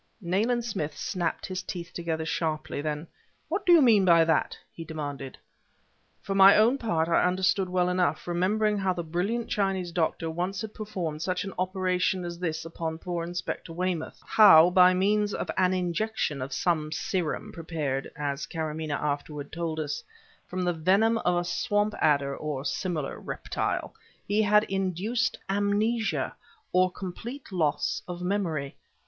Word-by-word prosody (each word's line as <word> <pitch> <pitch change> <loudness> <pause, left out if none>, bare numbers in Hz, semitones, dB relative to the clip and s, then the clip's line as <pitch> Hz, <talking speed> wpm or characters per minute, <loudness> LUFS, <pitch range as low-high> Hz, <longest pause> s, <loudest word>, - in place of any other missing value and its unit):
Nayland 220 +6 0
Smith 160 -10 -3
snapped 175 -4 -2
his 185 -1 -4
teeth 175 -1 -7
together 165 -2 -3
sharply; 155 -2 -2
then: 150 +1 -3 0.4
"What 405 -1 -2
do - - +7
you 335 -4 +8
mean 220 -6 +5
by 170 -3 +6
that?" 160 - +1 0.2
he 165 - -7
demanded. 145 -4 -6 0.9
For 195 - -2
my 195 0 +8
own 235 +6 +4
part 165 -9 0
I 170 - +3
understood 185 +1 +1
well 180 0 +1
enough, 180 -4 0
remembering 205 +4 +1
how 190 -1 +1
the 175 -1 -4
brilliant 190 +9 -2
Chinese 190 -3 -1
doctor 165 -1 -1
once 180 +4 -2
had 220 -1 -6
performed 175 -8 -4
such 180 +1 -1
an 195 -2 -6
operation 185 -1 0
as 170 0 -6
this 160 -2 -3
upon 165 -1 -4
poor 170 0 -4
Inspector 175 0 -5
Weymouth; 175 -1 -3
how, 180 -5 +7
by 180 0 +6
means 205 +2 +1
of - - -3
an 185 -1 +3
injection 180 -4 -1
of 130 +2 -4
some 155 -4 0
serum 175 -1 -2
prepared 155 -5 -3
(as 145 -1 -3
Karamaneh 155 -2 -3
afterwards 145 0 -3
told 165 -1 -3
us) 150 -2 -3 0.4
from 185 0 -3
the 175 0 +1
venom 195 +8 +3
of 180 -4 +1
a 175 - +1
swamp 205 +4 0
adder 140 -2 +2
or 145 -2 -4
similar 175 -5 -2
reptile, - - -3 0.3
he 210 +2 +2
had 210 0 +5
induced 195 +5 -1
amnesia, 205 +3 0 0.4
or 185 0 +4
complete 220 +9 -7
loss 150 -5 0
of 180 0 -6
memory. 170 -8 -1
180 Hz, 155 wpm, -27 LUFS, 160-195 Hz, 0.9 s, you